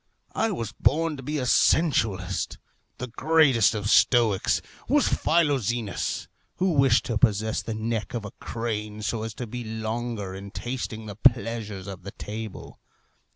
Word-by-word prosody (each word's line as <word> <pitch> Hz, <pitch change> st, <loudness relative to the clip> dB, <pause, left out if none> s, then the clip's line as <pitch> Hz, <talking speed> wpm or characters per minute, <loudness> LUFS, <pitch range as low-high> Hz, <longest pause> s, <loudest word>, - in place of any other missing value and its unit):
I 225 Hz, -, +1 dB
was 115 Hz, -, -3 dB
born 160 Hz, +1 st, +1 dB
to -, -, -7 dB
be 150 Hz, +4 st, -3 dB
a 130 Hz, -, -1 dB
sensualist. 115 Hz, -, +2 dB, 0.4 s
The 125 Hz, -, -4 dB
greatest 135 Hz, -3 st, +3 dB
of 105 Hz, -1 st, -2 dB
stoics 110 Hz, -3 st, +4 dB, 0.3 s
was -, -, +4 dB
Philoxenus, 120 Hz, -, 0 dB, 0.3 s
who 185 Hz, 0 st, +1 dB
wished 135 Hz, -6 st, +4 dB
to 115 Hz, -3 st, -1 dB
possess 110 Hz, +1 st, +2 dB
the 115 Hz, -, -4 dB
neck 110 Hz, -1 st, -3 dB
of 115 Hz, -3 st, -3 dB
a 105 Hz, -, -7 dB
crane, 105 Hz, -2 st, -4 dB
so 110 Hz, +1 st, -1 dB
as 110 Hz, -1 st, -5 dB
to 125 Hz, -, -5 dB
be 120 Hz, +2 st, -6 dB
longer 110 Hz, -2 st, -4 dB
in 100 Hz, +1 st, -8 dB
tasting 115 Hz, -1 st, -5 dB
the 105 Hz, -2 st, -7 dB
pleasures 115 Hz, -4 st, +1 dB
of 95 Hz, -3 st, -7 dB
the 100 Hz, +2 st, -8 dB
table. 110 Hz, -1 st, -7 dB
115 Hz, 155 wpm, -26 LUFS, 105-125 Hz, 0.4 s, stoics